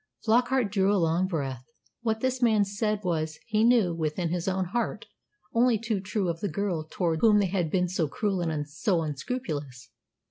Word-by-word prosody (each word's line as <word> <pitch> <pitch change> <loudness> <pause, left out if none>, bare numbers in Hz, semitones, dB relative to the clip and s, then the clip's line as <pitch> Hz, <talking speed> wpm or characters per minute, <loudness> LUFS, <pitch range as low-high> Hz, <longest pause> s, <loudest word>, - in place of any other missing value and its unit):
Flockart 245 0 +2
drew 195 -1 +2
a 205 - +3
long 170 +1 +2
breath. 135 -8 -3 0.4
What 220 -1 -1
this 260 0 0
man 220 -4 +4
said 210 +1 -2
was, 160 -3 -1
he 215 -1 +1
knew 230 -7 +4
within 165 +1 -2
his 175 +1 -2
own 190 0 0
heart, 235 +7 -2 0.5
only 235 0 +4
too 220 -1 -2
true 190 0 -2
of 165 -1 -2
the 205 - -2
girl 170 -2 -2
towards 165 -3 -1
whom 215 -2 +6
they 205 - +3
had 175 -4 0
been 180 +2 +1
so 175 -3 0
cruel 195 +4 -1
and 155 -3 -2
so 165 +3 0
unscrupulous. 145 - -5
190 Hz, 185 wpm, -27 LUFS, 160-215 Hz, 0.5 s, whom